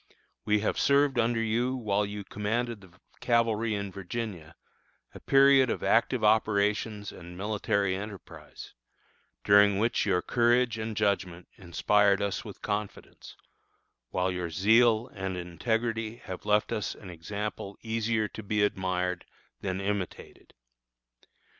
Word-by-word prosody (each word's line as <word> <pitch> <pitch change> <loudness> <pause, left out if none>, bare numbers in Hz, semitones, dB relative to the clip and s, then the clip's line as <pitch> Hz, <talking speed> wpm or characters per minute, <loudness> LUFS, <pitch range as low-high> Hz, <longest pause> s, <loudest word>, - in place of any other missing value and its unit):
We 105 0 +2
have 110 - -1
served 140 -2 +3
under 115 0 +1
you 120 +4 0
while 105 -4 0
you 105 0 -6
commanded 110 +3 -3
the 95 -1 -18 0.2
cavalry 115 -2 +1
in 100 -1 -4
Virginia 95 -4 -6 0.6
a - - -10
period 135 -1 +5
of - - -2
active 115 +1 +2
operations 105 -1 +1
and 90 0 -11
military 100 -1 0
enterprise 100 -1 -9 0.7
during 100 -1 +5
which 115 +3 +1
your 90 -2 +1
courage 120 -1 +2
and 110 -1 -4
judgment 95 -4 -1
inspired 100 +2 +2
us 100 -1 -2
with - - -11
confidence, 105 -1 -5 0.7
while 90 0 0
your 90 -2 -3
zeal 110 +6 +4
and 95 -2 -4
integrity 110 +5 -2
have 95 -3 -9
left 105 0 +2
us 105 - -2
an 95 -4 -11
example 100 +3 -6
easier 110 -1 0
to - - -8
be 105 0 0
admired 90 -3 -1 0.3
than 95 0 -3
imitated. 100 -2 -5
105 Hz, 130 wpm, -28 LUFS, 95-115 Hz, 0.7 s, period